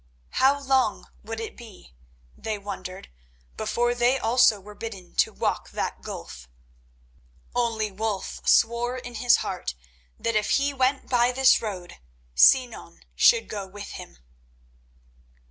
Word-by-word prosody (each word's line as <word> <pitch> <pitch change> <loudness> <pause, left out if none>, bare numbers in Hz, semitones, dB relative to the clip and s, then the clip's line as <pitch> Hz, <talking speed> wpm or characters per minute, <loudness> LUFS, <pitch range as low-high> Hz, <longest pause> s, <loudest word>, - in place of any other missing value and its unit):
How 275 +2 +3
long 265 -5 0
would 225 +1 -6
it 225 - -6
be, 215 - -14 0.4
they 220 -1 -4
wondered, 190 -2 -8 0.5
before 240 - 0
they 245 +2 +2
also 230 -3 +4
were 210 +2 -12
bidden 205 -5 -8
to - - +3
walk - - -2
that - - -4
gulf? - - -9 1.0
Only 225 -3 0
Wulf 205 0 -4
swore 235 +2 +3
in 245 -1 -8
his 240 +1 +4
heart 180 - -4 0.4
that 230 -1 -2
if 215 -1 +1
he 280 0 0
went 265 +1 0
by 245 -1 +3
this 265 +1 +4
road 190 -5 -6 0.4
Sinan 245 - +3
should 480 -2 +5
go 200 -2 -5
with 200 +1 -9
him. - - -10
225 Hz, 130 wpm, -25 LUFS, 205-250 Hz, 1.0 s, should